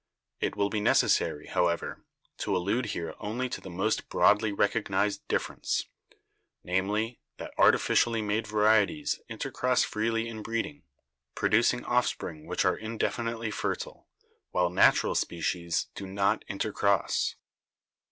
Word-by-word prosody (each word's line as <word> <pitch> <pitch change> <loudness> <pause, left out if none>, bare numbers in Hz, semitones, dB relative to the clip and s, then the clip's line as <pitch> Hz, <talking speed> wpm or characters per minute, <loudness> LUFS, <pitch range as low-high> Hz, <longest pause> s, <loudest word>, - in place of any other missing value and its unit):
It - - -1
will 100 0 0
be 110 - 0
necessary, 75 -6 +2
however, 85 -1 -1 0.4
to - - 0
allude 100 +7 0
here 85 -5 -4
only 120 +5 -2
to - - -5
the 95 - -9
most 95 +5 -1
broadly 105 +1 +4
recog 105 +2 +1
nised 100 +2 0
difference, - - -1 0.8
namely, 105 +6 -1 0.2
that - - -8
artificially 115 -2 +3
made 105 +1 -1
varieties 110 +7 +2
in 115 - -6
tercross 125 0 +1
freely 115 +1 -1
in 110 -1 -6
breeding, 115 +7 -4 0.5
producing - - +2
offspring 75 -1 -1
which - - 0
are - - +3
indefinitely 115 0 -2
fertile, - - -4 0.4
while 90 -1 +1
natural 90 - +4
species 85 0 -1
do 100 - -7
not 100 +1 +1
intercross. 100 -1 0
105 Hz, 125 wpm, -29 LUFS, 95-115 Hz, 0.8 s, broadly